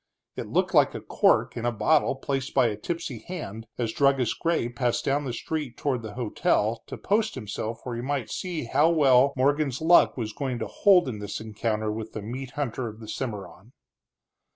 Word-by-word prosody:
It - - -5
looked - - 0
like - - +4
a - - -3
cork - - +2
in 115 - -4
a 120 - +1
bottle 145 +5 +2
placed 135 0 -3
by 130 -4 +5
a 105 - -3
tipsy 150 +2 -4
hand 115 - -7
as 115 -2 -1
Druggist 135 -4 +2
Gray 165 -8 +1
passed 120 0 -1
down 145 +1 +1
the 130 - -2
street 145 +2 -4
toward 130 -4 -1
the 110 -2 -8
hotel, 115 -1 0
to - - -7
post 215 +1 0
himself 110 -1 -5
where 125 -2 -4
he 120 - -3
might 135 -2 -2
see 175 -5 -3
how 140 +7 +3
well 140 -4 +5
Morgan's 140 0 +1
luck 165 -1 +5
was 110 -3 -3
going 130 -4 -3
to - - -3
hold 185 -6 +4
in 110 -5 -4
this 105 -1 -5
encounter 110 0 -2
with 110 0 -6
the 110 - -5
meat 125 +4 -5
hunter 130 -3 -2
of 110 0 -9
the 110 - -10
Cimarron. 105 -2 -6
125 Hz, 200 wpm, -26 LUFS, 110-145 Hz, -, by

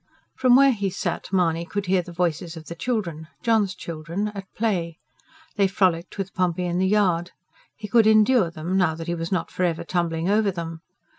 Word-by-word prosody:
From 255 -1 +4
where 275 +1 +7
he 200 -5 -1
sat 190 - -4
Mahony 170 -3 +1
could 200 +3 -4
hear 185 0 +2
the 175 - -11
voices 170 -1 -2
of 160 - -10
the 170 - -7
children 170 -6 -3 0.2
John's 220 -6 +2
children 170 +5 -4
at 195 -2 -9
play. 175 -7 -1 0.6
They 200 -1 +4
frolicked 185 -3 0
with 195 -1 -4
Pompey 180 -1 0
in 175 0 -1
the 190 - +2
yard. 185 -4 +1 0.4
He 215 - -7
could 225 0 +4
endure 220 -2 +5
them, 165 +3 -4
now 165 -4 +2
that 165 0 -7
he 170 - -2
was 165 +1 -4
not 185 -3 -1
for - - -5
ever 170 -1 0
tumbling 170 -1 -1
over 210 +1 +3
them. 165 -3 -5
180 Hz, 200 wpm, -24 LUFS, 170-205 Hz, 0.6 s, where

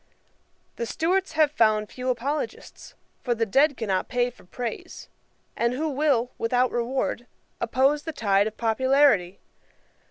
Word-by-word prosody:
The 235 - -3
Stuarts 365 +5 0
have 310 -2 +3
found 215 -5 +2
few 255 0 -4
apologists, 265 +5 -4 0.3
for 240 -2 0
the 225 0 0
dead 275 +7 +3
cannot 195 -5 -1
pay 245 0 0
for 240 - -20
praise; 235 +5 -7 0.5
and 235 +1 0
who 310 +5 -2
will, 270 -4 +1
without 245 +2 +1
reward, 240 0 -2 0.3
oppose 265 +5 +2
the 320 - -5
tide 205 -7 +2
of 220 - -7
popularity? 230 -5 +2
245 Hz, 135 wpm, -25 LUFS, 225-285 Hz, 0.5 s, have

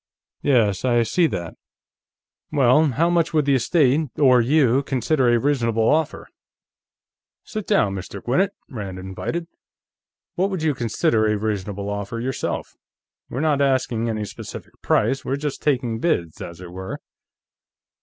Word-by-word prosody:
"Yes, 110 -9 +2
I 120 -2 +3
see 165 +9 +2
that. 85 - -4 1.0
Well, 140 0 +4
how 145 +5 +1
much 170 -2 +1
would 150 -2 +3
the 140 - +3
estate, 140 +2 +2
or 130 -4 +5
you, 135 0 +3
consider 130 0 +1
a 120 - +4
reasonable 115 -4 +1
offer?" 155 0 0 1.2
"Sit 215 -2 -6
down, 105 - +2
Mr. 95 +1 -6
Gwinnett," 175 - +1 0.2
Rand 100 -7 -6
invited. 95 - -4 0.9
"What 190 +2 0
would 185 -5 -3
you 155 -2 +2
consider 115 -1 +1
a 105 0 +1
reasonable 100 -1 -3
offer, 105 +2 -4
yourself? 125 +1 -3 0.5
We're 130 - -3
not 150 -3 +2
asking 130 -4 +1
any 110 -2 -2
specific - - -9
price; 135 - +1
we're 135 - -1
just 145 0 -4
taking 125 -6 0
bids, 85 - -1
as 85 +1 -8
it 90 -1 -9
were." 95 +1 -6
125 Hz, 145 wpm, -22 LUFS, 110-150 Hz, 1.2 s, or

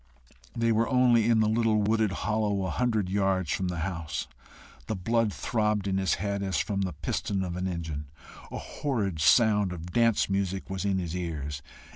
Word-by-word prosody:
They 115 0 +2
were 115 +1 +2
only 120 -3 +4
in 115 -2 +4
the 110 - +3
little 110 -1 +2
wooded 110 -1 +2
hollow, 100 0 0
a 95 - -2
hundred 110 -6 0
yards 95 -3 0
from 95 - -1
the 90 -2 -3
house. 85 -3 -3 0.6
The 110 - -1
blood 115 +3 +1
throbbed 105 -2 0
in 95 0 +1
his 95 -1 +1
head 100 +1 -2
as 95 -1 -1
from 100 -2 -1
the 95 -3 -2
piston 95 +6 -2
of 90 -2 -4
an 90 +1 -2
engine. 80 -5 -4 0.4
A - - -4
horrid 100 - -2
sound 105 -1 +4
of 85 0 -7
dance 115 -2 +3
music 95 -1 -2
was 95 +1 -3
in 100 -1 +1
his 85 -2 -3
ears. 75 -5 -4
100 Hz, 185 wpm, -28 LUFS, 90-110 Hz, 0.6 s, only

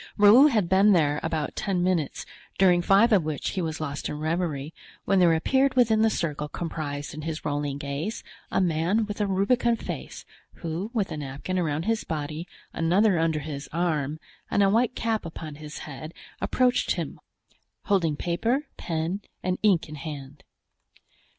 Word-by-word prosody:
Raoul 220 +8 +8
had 215 - +2
been 195 +3 +5
there 150 -4 +2
about 160 -2 -2
ten 185 -3 -1
minutes, 180 -5 0 0.3
during 180 -2 +5
five 200 +6 +5
of 205 -4 +5
which 150 -2 -2
he 190 - -2
was 160 -2 -3
lost 145 -2 -4
in 150 - -4
reverie, 155 -2 -2 0.3
when 195 - +3
there 175 -2 +6
appeared 265 +11 +2
within 225 -3 +4
the 225 - +5
circle 150 -6 -2
comprised 145 -5 -4
in 155 - -6
his 160 0 -5
rolling 145 -1 -1
gaze 145 +9 -4 0.3
a - - +1
man 180 +5 +1
with 210 0 -5
a 205 - +1
rubicund 230 +5 +2
face, - - -7 0.3
who, 170 +5 -4
with 210 -7 -1
a 155 - -4
napkin 145 +6 -3
around 155 -2 -1
his 225 +3 0
body, 155 +2 -4 0.3
another 180 +3 +3
under 160 -2 +1
his 140 -2 -6
arm, 155 -3 -1 0.3
and 205 - +3
a 195 - +4
white 240 +3 +2
cap 225 -2 -1
upon 160 -2 -7
his 150 0 -8
head, 155 +3 -8 0.3
approached 250 -1 +2
him, - - -5 0.6
holding 175 -7 +1
paper, 225 - 0
pen 165 +4 -2 0.2
and 185 0 -1
ink 195 -7 +3
in 155 - -9
hand. 145 -2 -8
170 Hz, 170 wpm, -26 LUFS, 150-205 Hz, 0.6 s, Raoul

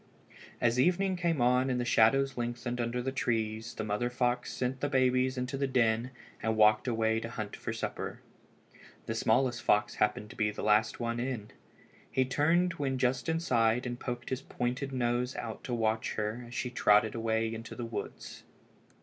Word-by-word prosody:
As 120 +1 +2
evening 185 +6 +2
came 170 -6 0
on 125 +2 +3
and 125 -1 0
the 120 - -1
shadows 135 +4 +4
lengthened 120 0 -3
under 120 +1 -2
the 135 - -1
trees 115 -3 -2
the 110 - -3
mother 105 +3 -1
fox 125 0 0
sent 130 +1 -2
the 145 - -1
babies 130 -1 +2
into 125 +2 -2
the 140 0 0
den 115 -2 +2 0.3
and 110 0 0
walked 110 +2 +5
away 110 -1 +1
to 115 - -6
hunt 110 -4 -5
for - - -7
a - - -2
supper. - - -4 0.9
The 110 - -2
smallest 120 +2 +2
fox 105 -4 +2
happened 105 0 +1
to - - -12
be 105 -1 +1
the 105 - -6
last 105 +1 +3
one 115 0 -2
in. 120 -4 -4 0.6
He 130 - +1
turned 165 +7 +2
when 135 -2 0
just 125 +3 0
inside 125 -8 +2
and 120 0 -4
poked 120 -1 -5
his 130 +1 -1
pointed 125 +2 -3
nose 125 0 0
out 115 -2 -6
to 125 - -3
watch 110 -1 0
her 110 +3 -3
as 120 - -10
she 125 0 -2
trotted 105 -2 +4
away 115 0 0
into 115 +1 -7
the 120 - -4
woods. 115 - -6
120 Hz, 185 wpm, -31 LUFS, 110-130 Hz, 0.9 s, walked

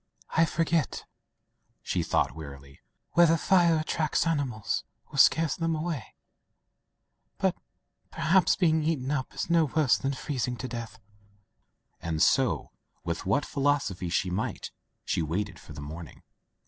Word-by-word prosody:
"I 165 - +4
forget,'* 165 -3 0 0.8
she - - -1
thought - - +1
wearily, 70 -3 -10 0.3
"whether 170 -1 +5
fires 170 -1 +4
attract 155 0 0
animals, 140 -10 -1 0.3
or 140 - -3
scare 165 +4 +6
them, 165 +2 -1
away, 155 -6 -4 1.2
but, - - +1 0.5
perhaps, 180 +3 +3
being 160 -3 +2
eaten 150 -4 -1
up 130 -3 -2
is - - -2
no 165 -1 +5
worse 150 -2 +2
tfian 135 0 -1
freezing 125 -3 -3
to 130 - -5
death,'* 115 -3 -7 1.0
and 80 -2 -2
so, 130 - +2 0.3
with 85 +1 -3
what 125 +9 +2
philosophy 135 -11 0
she 90 +2 0
might, 100 +5 -3 0.3
she - - 0
waited 90 +4 -3
for - - -12
the 70 - -8
morning. 75 0 -9
135 Hz, 135 wpm, -28 LUFS, 95-160 Hz, 1.2 s, scare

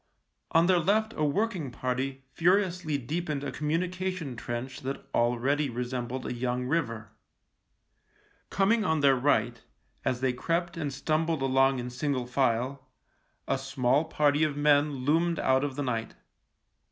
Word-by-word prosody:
On 165 +1 +4
their 180 -1 +4
left 220 +6 +1
a 155 - -1
working 180 - 0
party 130 +2 -3
furiously 175 -3 +2
deepened 150 +2 -3
a 145 - -3
communication 175 -1 -2
trench 120 +2 -5
that 135 +1 -5
already 130 +5 +1
resembled 125 +1 -4
a - - -3
young 125 +1 -2
river. 115 -8 -2 1.4
Coming 210 +4 +2
on 160 -5 +1
their 140 -1 +5
right, 120 -3 +1 0.4
as 125 - 0
they 130 -1 +1
crept 170 +6 -1
and 150 -4 -3
stumbled 155 +2 0
along 135 0 +3
in 125 0 -4
single 130 0 -1
file, 130 +1 -1 0.6
a 135 - 0
small 135 +2 +1
party 150 -1 +2
of 150 -2 0
men 145 -2 +2
loomed 165 +3 +2
out 130 -1 +2
of 140 -2 -2
the 145 - -2
night. 115 -3 -3
140 Hz, 140 wpm, -28 LUFS, 125-165 Hz, 1.4 s, their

